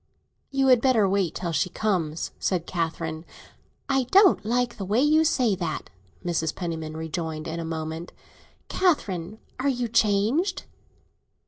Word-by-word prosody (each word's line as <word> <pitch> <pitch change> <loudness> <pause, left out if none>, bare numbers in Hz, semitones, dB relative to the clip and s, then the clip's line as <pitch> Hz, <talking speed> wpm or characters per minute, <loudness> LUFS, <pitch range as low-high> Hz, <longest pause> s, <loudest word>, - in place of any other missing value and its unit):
"You 270 -1 +1
had 250 -2 +6
better 240 -7 +4
wait 190 -4 0
till 175 -2 -3
she 180 +3 0
comes," 175 -6 -1
said 180 -3 0
Catherine. 165 -2 -3 0.6
"I 270 -2 +1
don't 380 - +5
like 240 +2 0
the 200 - -4
way 205 +5 +1
you 305 +3 +4
say 255 -9 +2
that," 170 -4 -4 0.3
Mrs. 160 -2 -1
Penniman 160 -3 -4
rejoined, 160 -1 -4
in 165 +1 -4
a 165 - -4
moment. 160 +1 -5 0.6
"Catherine, 215 - 0 0.2
are 280 +2 +1
you 245 -2 -1
changed?" 230 - +1
190 Hz, 140 wpm, -25 LUFS, 165-250 Hz, 0.6 s, had